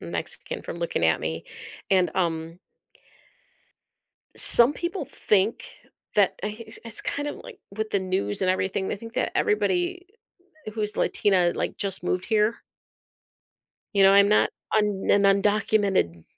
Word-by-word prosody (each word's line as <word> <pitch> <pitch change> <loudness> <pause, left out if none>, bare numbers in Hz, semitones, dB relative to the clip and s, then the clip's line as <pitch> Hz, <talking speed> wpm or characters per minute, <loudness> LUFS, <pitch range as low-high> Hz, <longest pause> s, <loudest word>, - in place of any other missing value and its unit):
Mexican 85 -1 -5
from 170 - -7
looking 170 - -1
at 80 0 +3
me, 80 +1 -4 0.5
and, 185 -2 +3
um 165 -1 -2 1.8
some 240 +4 +4
people 345 +4 -4
think 210 +2 0 0.5
that 205 -3 +3
i 210 +1 -3
it's 220 - -7
it's 230 -1 -1
kind 290 +1 -3
of - - -5
like - - -12 0.2
with 220 0 -3
the 200 - +2
news 145 - -1
and 185 - +3
everything, 190 +1 -1
they - - -2
think 230 +2 -11
that - - -1
everybody 365 -3 0 0.7
who's 210 -1 -1
Latina, 180 -4 +2
like, - - -3
just 195 -3 -3
moved 180 +1 -1
here 220 0 +2 1.4
you 200 - +4
know, 195 0 +7
I'm 200 0 +6
not 210 - +3 0.3
un 210 -2 0
an 200 - +4
undocumented 200 - +2
200 Hz, 145 wpm, -25 LUFS, 180-220 Hz, 1.8 s, know